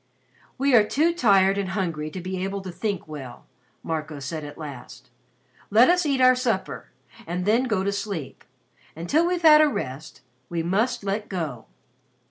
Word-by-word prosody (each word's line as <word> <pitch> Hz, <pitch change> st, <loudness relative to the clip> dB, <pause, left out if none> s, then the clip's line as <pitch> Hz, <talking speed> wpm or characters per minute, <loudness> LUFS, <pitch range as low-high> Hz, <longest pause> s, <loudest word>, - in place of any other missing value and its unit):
"We 275 Hz, 0 st, +1 dB
are 225 Hz, -3 st, +7 dB
too 310 Hz, +10 st, +1 dB
tired 195 Hz, -, +3 dB
and 195 Hz, -2 st, -2 dB
hungry 160 Hz, -5 st, -2 dB
to 185 Hz, -, -7 dB
be 185 Hz, +1 st, -4 dB
able 195 Hz, +1 st, -3 dB
to 190 Hz, -1 st, -7 dB
think 195 Hz, +1 st, -3 dB
well," 140 Hz, -5 st, -9 dB, 0.4 s
Marco 155 Hz, -2 st, -4 dB
said 155 Hz, +3 st, -5 dB
at 145 Hz, 0 st, -9 dB
last. 145 Hz, -5 st, -10 dB, 0.6 s
"Let 235 Hz, +9 st, +6 dB
us 360 Hz, -3 st, +1 dB
eat 275 Hz, -2 st, +1 dB
our 255 Hz, 0 st, +7 dB
supper 245 Hz, -6 st, -2 dB, 0.4 s
and 180 Hz, +2 st, -3 dB
then 230 Hz, +5 st, +3 dB
go 215 Hz, -6 st, 0 dB
to 200 Hz, -, 0 dB
sleep. 200 Hz, -8 st, -5 dB, 0.5 s
Until 290 Hz, -, +1 dB
we've 355 Hz, -1 st, -1 dB
had 305 Hz, -1 st, +8 dB
a 310 Hz, -, +5 dB
rest, 150 Hz, -, -5 dB, 0.3 s
we 170 Hz, -1 st, -2 dB
must 205 Hz, +8 st, 0 dB
'let 205 Hz, +2 st, -3 dB
go.'" 155 Hz, -, -5 dB
195 Hz, 170 wpm, -24 LUFS, 165-245 Hz, 0.6 s, had